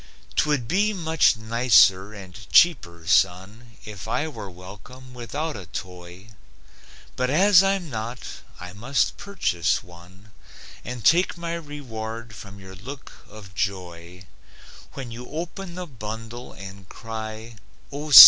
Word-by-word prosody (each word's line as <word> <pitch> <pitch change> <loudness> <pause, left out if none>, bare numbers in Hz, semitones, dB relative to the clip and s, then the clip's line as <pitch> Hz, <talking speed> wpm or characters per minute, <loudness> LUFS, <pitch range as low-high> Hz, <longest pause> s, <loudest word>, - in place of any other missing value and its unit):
'Twould 145 - +2
be 205 - +2
much 160 - +3
nicer 110 -4 +5
and 95 -2 -11
cheaper, 85 - +5
son, 100 +8 +2
If 105 -4 -8
I 155 - 0
were 110 -10 -7
welcome 100 +8 -12
without 145 +6 -3
a 95 -5 -8
toy, 90 +3 -8 0.9
But 125 0 0
as 185 +6 +7
I'm 195 -2 +1
not, 115 -1 -4 0.4
I 90 0 -8
must 125 +7 +1
purchase 85 - 0
one 90 +4 -16 0.5
And 125 -4 -6
take 175 +2 +5
my 170 0 -3
reward 115 -8 -6
from 100 -1 -10
your 95 -1 -11
look 130 +9 -9 0.2
of 100 -3 -12
joy 90 -1 -4 0.7
When 130 -3 -6
you 120 +2 -8
open 175 +3 -5
the 180 0 -4
bundle 115 - -7
and 95 -1 -10
cry: 110 0 -7 0.3
"O, 145 +2 -5
see! 130 -7 +13
115 Hz, 130 wpm, -25 LUFS, 95-145 Hz, 0.9 s, see